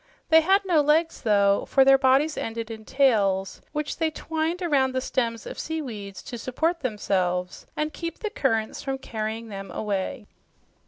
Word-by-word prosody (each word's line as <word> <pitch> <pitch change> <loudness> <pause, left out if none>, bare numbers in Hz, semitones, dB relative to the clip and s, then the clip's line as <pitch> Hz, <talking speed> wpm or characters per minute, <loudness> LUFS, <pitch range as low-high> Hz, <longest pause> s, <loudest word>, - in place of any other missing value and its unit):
They 320 0 +7
had 390 +4 +3
no 340 -5 +4
legs, 315 +3 +2
though, 200 -3 +3
for 270 -1 +4
their 270 0 +7
bodies 270 +4 +3
ended 225 0 -4
in 220 -1 -8
tails 205 -9 +2
which 300 -1 -3
they 320 -1 +1
twined 320 +3 -3
around 270 -6 +2
the - - +2
stems 235 -3 -2
of - - -7
seaweeds 230 -12 -5
to 240 - -7
support 320 +9 -1
themselves 185 -6 -1
and 305 0 -1
keep 335 -1 -5
the 430 - -4
currents 225 -5 -1
from 270 -1 -3
carrying 225 -2 -5
them 195 -1 -7
away. 210 +3 -3
260 Hz, 165 wpm, -25 LUFS, 215-310 Hz, -, They